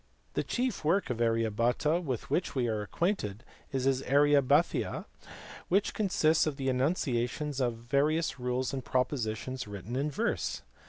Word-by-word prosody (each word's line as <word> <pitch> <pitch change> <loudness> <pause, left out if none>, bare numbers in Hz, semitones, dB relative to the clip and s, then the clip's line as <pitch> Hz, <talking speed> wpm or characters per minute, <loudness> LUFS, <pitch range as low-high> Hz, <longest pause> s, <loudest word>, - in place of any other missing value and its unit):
The - - 0
chief 250 -7 -2
work 165 -1 +2
of 120 -1 -3
Arya 115 -1 +2
Bhata 125 - +1
with 130 -7 -4
which 175 - 0
we 125 -3 +1
are 110 -2 -1
acquainted 110 - -2 0.3
is 135 -1 -1
his 135 0 +2
Aryabhathiya 145 -1 +3 0.6
which 200 +3 +2
consists 165 -6 +2
of 150 - -1
the 135 -1 -1
enunciations 130 0 0
of 120 -2 +1
various 140 +6 0
rules 125 +1 -1
and 130 -2 -3
pro 130 +1 +2
positions 125 -1 -4
written 100 +3 -6
in 140 +3 0
verse. 145 - -2
130 Hz, 155 wpm, -30 LUFS, 120-150 Hz, 0.6 s, Aryabhathiya